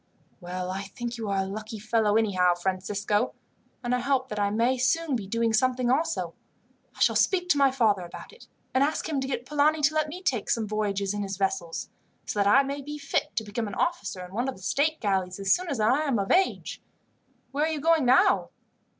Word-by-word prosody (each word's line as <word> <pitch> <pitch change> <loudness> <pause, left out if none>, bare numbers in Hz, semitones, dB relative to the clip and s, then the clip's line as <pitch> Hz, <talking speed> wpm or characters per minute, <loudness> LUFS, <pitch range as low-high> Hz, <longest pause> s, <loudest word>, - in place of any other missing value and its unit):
"Well, 180 0 -4
I 190 +1 -3
think 240 +4 -6
you 220 -2 -3
are 195 -1 +1
a - - -4
lucky 215 +3 -6
fellow 215 0 +1
anyhow, 185 -5 +3
Francisco, 195 +3 -1 0.5
and 240 0 -1
I 250 - +2
hope 260 0 0
that 210 - -4
I 200 0 +2
may 230 +4 +2
be 260 - -1
soon 310 +3 +1
doing 230 +1 -1
something 250 +1 +2
also. 320 +5 0 0.6
I - - -16
shall - - +4
speak 360 -2 +2
to 290 - +4
my 275 -1 +6
father 220 -7 +2
about 175 - -10
it, 465 - -16 0.3
and 260 - +4
ask 300 +2 -1
him 295 -4 -1
to 265 - -3
get 250 -2 -3
Polani 300 +2 +2
to 290 +1 +3
let 310 -1 0
me 360 +5 -8
take 245 - -1
some 225 -2 +1
voyages 200 -2 -1
in 205 - -3
his 195 -1 -4
vessels, 190 -4 -2 0.4
so 210 - -3
that 200 - +3
I 270 +7 +6
may 280 +1 -4
be 295 +2 -6
fit 280 -1 -2
to 220 - 0
become 215 +1 -3
an 200 - -6
officer 200 - -2
in 180 - -14
one 240 +5 -1
of 265 - -5
the 190 - -15
state 305 +9 +1
galleys, 190 -3 0
as 195 0 +3
soon 365 -1 -1
as 275 - -2
I 225 +6 +3
am 285 -6 0
of 195 -1 -1
age. 380 +1 +1 0.7
Where 290 +3 +1
are - - 0
you 310 - -2
going 325 0 +3
now?" 275 +11 +4
230 Hz, 225 wpm, -27 LUFS, 200-280 Hz, 0.7 s, my